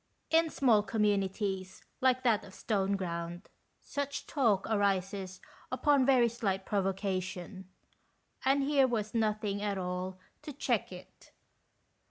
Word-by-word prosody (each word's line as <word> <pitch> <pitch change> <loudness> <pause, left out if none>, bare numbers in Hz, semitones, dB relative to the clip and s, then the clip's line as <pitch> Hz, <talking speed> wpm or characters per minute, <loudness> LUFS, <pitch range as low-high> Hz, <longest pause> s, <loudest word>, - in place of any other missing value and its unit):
In 325 0 +4
small 240 -8 +4
communities, 200 -3 -1 0.2
like 255 0 +3
that 220 -4 +3
of 190 - -13
Stoneground, 185 -4 -2 0.3
such 285 0 -4
talk 225 -10 +2
arises 195 -2 0 0.3
upon 285 -4 +3
very 255 -3 +5
slight 200 -5 -2
provocation, 190 -1 -2 0.7
and 275 +1 +3
here 275 -1 +4
was 215 -4 -2
nothing 215 -2 0
at 205 -1 -1
all 180 0 -3 0.2
to 295 - -7
check 285 - -1
it. - - -13
205 Hz, 115 wpm, -31 LUFS, 190-245 Hz, 0.7 s, very